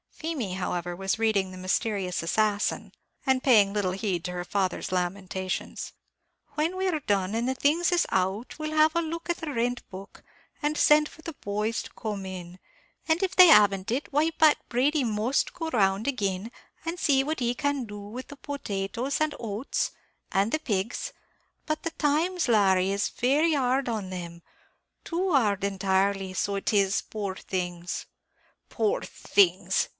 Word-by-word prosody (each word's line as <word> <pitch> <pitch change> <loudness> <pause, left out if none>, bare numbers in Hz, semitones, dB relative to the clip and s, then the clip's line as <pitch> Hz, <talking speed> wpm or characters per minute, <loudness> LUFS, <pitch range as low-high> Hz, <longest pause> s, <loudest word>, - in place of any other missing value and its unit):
Feemy, 295 - -4
however, 175 -1 -3
was 195 +2 -1
reading 215 -4 +1
the 185 - -9
"Mysterious 185 0 -1
Assassin," 205 +4 0 0.3
and 265 -1 +2
paying 210 -7 +5
little 200 -3 0
heed 190 -3 -2
to 180 - -3
her 175 0 -3
father's 190 -1 -1
lamentations. 185 +1 -3 0.6
"When 320 +4 0
we're 370 -4 0
done, 195 -3 0
and 235 +3 0
the 260 - -1
things 320 +7 +2
is 350 -1 +3
out, 190 +5 -1
we'll 310 0 -3
have 310 +1 +4
a 335 - +3
look 335 +1 -5
at 345 - -2
the 315 -2 -5
rent 245 -1 -1
book, 195 +2 -11 0.4
and 300 0 0
send 300 0 +5
for 315 - -16
the 330 - -6
boys 210 -1 -2
to - - -12
come 205 -3 -4
in; 180 -1 -8 0.5
and 320 +1 +2
if 380 0 -1
they 365 -1 +10
haven't 200 - +5
it, 265 +5 -2
why, 305 +3 +3
Pat 315 -1 +5
Brady 275 +4 +2
must 225 +3 0
go 325 -3 -4
round 200 -3 +1
agin, 205 -4 -1 0.3
and 335 +2 -3
see 270 -3 +3
what 310 +3 -2
he 240 -1 +1
can 285 -2 -1
do 205 -1 -8
with 215 +6 -8
the 285 - -11
potatoes 250 -1 -3
and 310 -1 +1
oats, 225 +3 -2 0.4
and 200 +3 +2
the 310 - +1
pigs; 230 - -2 0.5
but 310 -1 -2
the 330 - -2
times, 325 +4 +1
Larry, 195 -4 +4
is 200 +1 0
very 295 +6 +2
hard 260 -2 +1
on 210 -5 -3
them; 170 -2 -7 0.6
too 365 +2 -1
hard 210 - +2
entirely, 195 0 0
so 200 +2 -1
it 195 - -1
is, 200 -1 +3
poor 200 -3 -5
things 180 -2 -4 0.3
" - - -39
"Poor 440 +4 0
things!" 395 -3 +2
220 Hz, 170 wpm, -27 LUFS, 195-300 Hz, 0.6 s, they